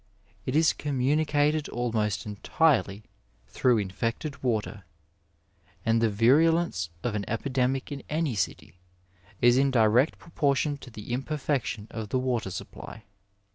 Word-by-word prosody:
It 130 - -1
is 160 0 +4
communicated 150 +2 +1
almost 110 -5 -1
entirely 105 0 +1 0.4
through 125 -2 +2
in 100 -3 -1
fected 115 +8 -3
water, 110 -4 -2 1.0
and 115 0 +3
the 115 - +3
virulence 130 - +3
of 120 - -1
an 105 -1 -2
epidemic 130 +3 -1
in 140 -1 -5
any 155 -3 0
city 90 -2 -4 0.6
is 120 +1 +5
in 140 0 +3
direct 120 +3 +3
proportion 145 -2 0
to 130 - -11
the 110 +1 -7
imperfection 135 -5 -2
of 110 -2 -5
the - - 0
water 125 -5 -1
supply. 95 +4 -8
125 Hz, 130 wpm, -27 LUFS, 110-145 Hz, 1.0 s, is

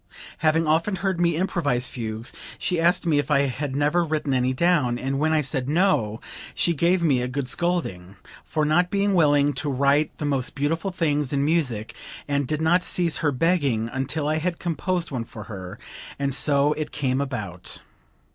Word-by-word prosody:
Having 160 +1 +2
often 165 +6 +1
heard 190 -1 -1
me 170 -2 +3
improvise 145 -8 0
fugues 115 -1 -5 0.2
she 180 -2 -1
asked 175 +1 +3
me 155 -4 +3
if 145 - -2
I 145 -2 +4
had 140 0 -2
never 150 +5 +2
written 155 -3 -1
any 130 0 +2
down, 140 -4 +2
and 135 +2 -2
when 155 +2 +2
I 155 -1 +3
said 135 -2 -1
no, 150 - +2 0.4
she 170 - +2
gave 170 +3 +2
me 135 -6 +3
a 125 - -1
good 130 +1 -3
scolding, 125 - -2 0.3
for 155 -1 -1
not 175 +4 +2
being 200 +1 +1
willing 145 -4 +4
to 145 +3 -2
write 140 +3 +2
the 150 - -4
most 135 -3 -1
beautiful 160 +7 -1
things 150 -6 0
in 140 -1 +1
music, 135 -9 0 0.3
and 140 -2 0
did 155 +2 -1
not 175 +3 +3
cease 170 -3 +1
her 150 -3 +1
begging 140 -7 +1
until 140 +3 -2
I 155 +1 +1
had 170 +1 -2
composed 175 0 -2
one 125 -4 -2
for 110 -1 -10
her, 95 -1 -8 0.4
and 140 -1 -1
so 145 +2 +2
it 150 0 -4
came 135 -2 0
about. 105 -10 -5
145 Hz, 185 wpm, -24 LUFS, 130-165 Hz, 0.4 s, I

